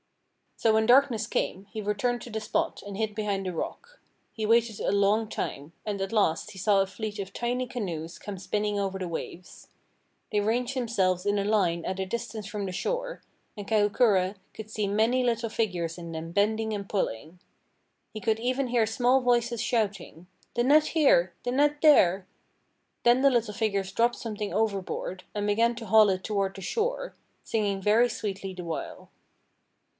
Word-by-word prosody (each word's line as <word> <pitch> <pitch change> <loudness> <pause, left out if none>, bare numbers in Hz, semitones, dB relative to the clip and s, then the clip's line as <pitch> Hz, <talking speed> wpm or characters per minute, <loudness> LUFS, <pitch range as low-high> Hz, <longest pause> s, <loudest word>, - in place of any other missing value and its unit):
So 225 - +3
when 220 0 +3
darkness 245 -3 +4
came, 190 -2 -2
he 220 - -4
returned 210 +4 -1
to 240 - -9
the 220 - -2
spot, 215 - -2
and 200 -1 -6
hid 220 -1 -1
behind 205 -2 -2
a 180 - -3
rock. 475 - -6 0.3
He 220 - -3
waited 230 -1 +3
a - - 0
long 205 +2 +2
time, 145 -6 -5
and 205 -2 -3
at 195 - -2
last 200 -7 +1
he 190 - -10
saw 200 +1 +3
a 195 - 0
fleet 215 +1 -5
of 195 -1 -5
tiny 245 +1 -1
canoes 175 -10 -5
come 205 -2 -7
spinning 210 +2 -1
over 195 -1 -2
the 185 - -3
waves. 170 +1 -7 0.6
They 210 - +2
ranged 240 +5 0
themselves 195 -7 0
in 205 0 +2
a - - 0
line 185 -6 +1
at 190 +1 -3
a 190 - -1
distance 220 +1 -5
from 205 -1 -4
the 185 - -4
shore, - - -3 0.3
and 205 -2 -8
Kahukura 205 -3 +3 0.2
could 220 -1 -8
see 210 -2 -1
many 225 +5 +2
little 230 -1 0
figures 180 -7 -2
in 170 -1 -7
them 165 +1 -6
bending 220 +3 +1
and 200 -1 -5
pulling. 165 - -3 0.7
He 215 - -7
could 220 -1 +1
even 255 +3 0
hear 235 -2 +2
small 245 +4 +3
voices 240 -2 +1
shouting: 200 -7 -2 0.3
"The 240 - +2
net 300 +4 +5
here! 185 - +3
The 245 - -1
net 290 +3 +2
there!" 190 - +5 0.8
Then 240 +2 +5
the 275 0 +5
little 230 -4 0
figures 200 -3 -1
dropped 240 +1 +2
something 210 -3 -5
overboard, 195 -3 -2
and 205 0 -1
began 230 +3 +2
to 230 -1 -7
haul 215 +1 +6
it 185 -1 -1
toward 200 -2 -1
the 195 - -8
shore, - - -2 0.3
singing 205 -3 -1
very 220 +5 +4
sweetly 195 -3 -4
the 180 - -6
while. 165 -2 -6
210 Hz, 180 wpm, -27 LUFS, 195-235 Hz, 0.8 s, haul